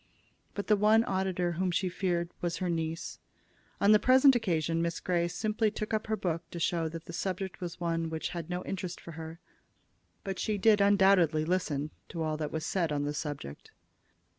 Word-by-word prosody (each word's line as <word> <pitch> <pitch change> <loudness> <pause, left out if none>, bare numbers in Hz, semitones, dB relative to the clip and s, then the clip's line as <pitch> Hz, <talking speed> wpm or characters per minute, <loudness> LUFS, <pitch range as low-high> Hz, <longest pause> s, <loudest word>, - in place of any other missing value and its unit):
But 200 - -3
the 215 - +4
one 215 +2 +4
auditor 190 -3 -1
whom 180 +2 -1
she 185 +2 0
feared 175 -1 -1
was 175 -1 -1
her 180 -2 -1
niece. 165 0 -3 0.6
On 200 - +5
the 210 - +7
present 260 +4 +6
occasion 165 -6 0
Miss 170 0 -1
Grey 175 -1 0
simply 215 +4 0
took 215 +1 -5
up 215 0 -1
her 220 - +1
book 170 -4 -1
to 170 - -6
show 165 -1 0
that 165 0 -8
the 170 - -9
subject 190 +1 -3
was 175 -1 -5
one 165 -1 -1
which 160 0 -3
had 170 -1 -6
no 180 0 -3
interest 185 -2 -5
for 170 - -10
her; 160 +1 -8 0.8
but 195 -2 -4
she 215 -1 0
did 210 +1 +4
undoubtedly 190 -6 +4
listen 155 -4 -1 0.2
to 165 -2 -3
all 155 -1 -1
that 150 -1 -3
was 160 0 -3
said 170 -4 0
on 145 -1 0
the 145 +1 -2
subject. 145 - -6
175 Hz, 195 wpm, -30 LUFS, 165-195 Hz, 0.8 s, the